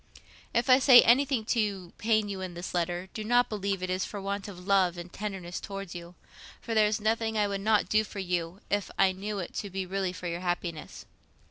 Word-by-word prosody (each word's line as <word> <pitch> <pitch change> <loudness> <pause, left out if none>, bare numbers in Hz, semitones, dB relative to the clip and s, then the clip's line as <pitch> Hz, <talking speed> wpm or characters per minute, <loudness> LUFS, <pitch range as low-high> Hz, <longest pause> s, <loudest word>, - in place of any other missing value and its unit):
If 235 +2 +1
I 255 0 +7
say 255 -2 +8
anything 255 -1 +3
to 205 -6 -1
pain 220 -1 +2
you 195 -2 -5
in 185 -2 -6
this 175 +2 -6
letter, 175 +1 -2
do 215 - -5
not 245 +3 +3
believe 200 -3 -2
it 185 - -2
is 185 +1 0
for 205 - -5
want 200 +1 -4
of 180 -3 -10
love 190 -3 +3
and 175 +1 -8
tenderness 190 -4 -5
towards 195 -2 -7
you, 175 0 -9 0.4
for 230 - -5
there 215 -1 +5
is 210 +1 -1
nothing 220 +1 0
I 210 -1 +2
would 200 -1 -3
not 215 0 +2
do 215 0 +3
for 210 - -10
you, 180 -1 -3
if 205 -1 0
I 190 - +4
knew 200 +3 -5
it 180 -3 -5
to 205 - -3
be 190 0 -3
really 190 0 -2
for 180 - -9
your 170 0 -2
happiness. 175 -3 -4
195 Hz, 225 wpm, -29 LUFS, 180-215 Hz, 0.4 s, say